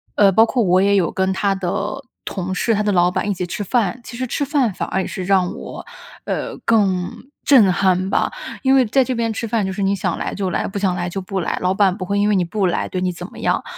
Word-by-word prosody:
呃， 200 -2 +5
包 220 +5 +6
括 235 +1 0
我 185 -1 +3
也 200 +1 +3
有 185 -4 +2
跟 190 0 0
他 195 +1 0
的 195 +8 -3 0.2
同 185 -1 -3
事、 225 +3 +1
他 210 - 0
的 205 - +1
老 175 -2 +4
板 205 - -1
一 - - +1
起 180 -1 -3
吃 175 +4 -4
饭。 225 +2 0
其 235 - -9
实 255 0 -2
吃 285 - -1
饭 275 -7 +1
反 - - -4
而 190 - 0
也 - - -4
是 185 - -5
让 185 -1 +2
我， - - -8 0.4
呃， - - -3
更 195 -5 +2 0.3
震 225 -10 +6
撼 185 +1 +1
吧。 - - +1 0.3
因 265 0 +4
为 260 -2 +5
在 260 +4 +3
这 255 - -2
边 230 -1 0
吃 230 +1 -4
饭 220 -3 0
就 190 - -2
是 195 +1 -3
你 195 +1 +2
想 195 - -2
来 - - -3
就 195 -2 -2
来， - - -1
不 200 - -4
想 190 -2 +1
来 175 -1 -2
就 195 +2 -4
不 190 +1 -3
来， 170 - -2
老 185 +1 +1
板 195 -2 +3
不 185 - -6
会 200 +2 0
因 205 +1 +2
为 210 - +3
你 185 - +2
不 190 +3 -1
来 175 - -1
对 185 - -3
你 185 - 0
怎 175 +1 -8
么 - - -15
样。 - - 0
195 Hz, 295 characters per minute, -20 LUFS, 185-215 Hz, 0.4 s, 包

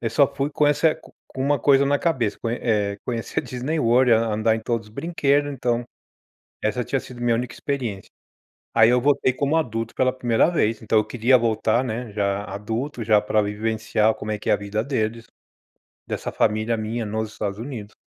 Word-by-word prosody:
eu 115 - -2
só 140 +4 +3
fui 140 +1 -2
com 150 0 +2
essa 150 +2 +3
co - - -18 0.2
com 130 - -4
uma 145 +1 +2
coisa 140 +2 +4
na 145 +1 +2
cabeça, 130 -11 0
conhe 115 +1 -2
eh, 105 -3 0
conhecer 115 -2 -3
a - - -14
Disney 130 +6 -3
World, 125 0 +4
an 115 0 +3
andar 110 +1 +2
em - - -5
todos 115 0 -2
os - - -19
brinquedos, 145 -3 +1
então 120 -2 -1 0.8
essa 110 +3 0
tinha 135 - -1
sido 125 -1 -11
minha 120 -1 +2
única 120 0 -2
experiência. 120 -9 -4 0.7
Aí 115 0 +6
eu 125 0 +3
voltei 135 -1 +2
como 140 +4 +1
adulto 115 -7 -2
pela 130 0 +1
primeira 125 +2 +2
vez, 115 -10 0
então 110 0 +1
eu 110 - +1
queria 125 +3 +3
voltar, 115 +1 +1
né, 120 -1 -4
já 100 -1 -1
adulto, 115 +7 -4
já 105 -1 +4
pra 105 +1 +1
vivenciar 110 +1 0
como 110 - -5
é 105 - -2
que - - -4
é - - +5
a - - +5
vida 105 +1 -3
deles, 115 -4 -2 0.8
dessa - - -4
família 110 +2 +1
minha 110 +2 -3
nos 110 0 -3
Estados 100 -2 -4
Unidos. 115 -3 -7
115 Hz, 205 wpm, -23 LUFS, 110-130 Hz, 0.8 s, Aí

